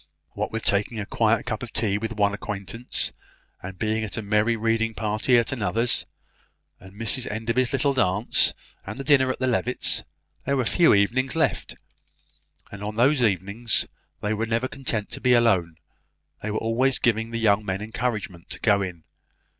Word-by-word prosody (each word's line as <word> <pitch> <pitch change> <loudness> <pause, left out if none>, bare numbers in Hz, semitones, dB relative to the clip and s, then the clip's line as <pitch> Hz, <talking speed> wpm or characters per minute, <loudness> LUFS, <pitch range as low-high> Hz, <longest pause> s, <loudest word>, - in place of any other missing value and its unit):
What - - -4
with 110 0 -4
taking 105 +3 0
a 105 - -3
quiet 110 +1 +1
cup 110 - -3
of 125 -3 -7
tea 105 -2 0
with 110 +1 -4
one 100 -2 +1
acquaintance, 105 +4 -2 0.5
and 95 0 -8
being 110 +1 -1
at 110 - -5
a 110 - -3
merry 105 +3 +2
reading 115 0 0
party 110 +4 +2
at 120 +2 +1
another's, 115 -1 +1 0.7
and 95 +1 -15
Mrs 115 +3 0
Enderby's 115 +3 -1
little 140 +1 +1
dance, 105 -3 +2 0.3
and 120 +8 -7
dinner 130 -2 +4
at - - -5
the 130 - -1
Levitts', 125 0 +1 0.4
there 140 +1 0
were 130 - 0
few 170 0 +4
evenings 125 +8 +1
left; 160 -4 0 1.0
and 100 - -9
on 105 +1 -4
those 130 +5 +3
few 120 - +5
evenings 100 +5 -1 0.4
they 105 +1 0
were 110 +1 -2
never 115 +3 0
content 120 -6 -4
to - - -5
be 125 -1 +4
alone. 95 -9 +2 0.7
They 110 - -4
were 105 - -2
always 125 +4 +2
giving 115 -1 +1
the 115 - -4
young 105 -2 +2
men 95 0 -3
encouragement 110 -6 -4
to - - -6
go 100 -3 +3
in. 90 -4 -5
110 Hz, 180 wpm, -24 LUFS, 105-120 Hz, 1.0 s, few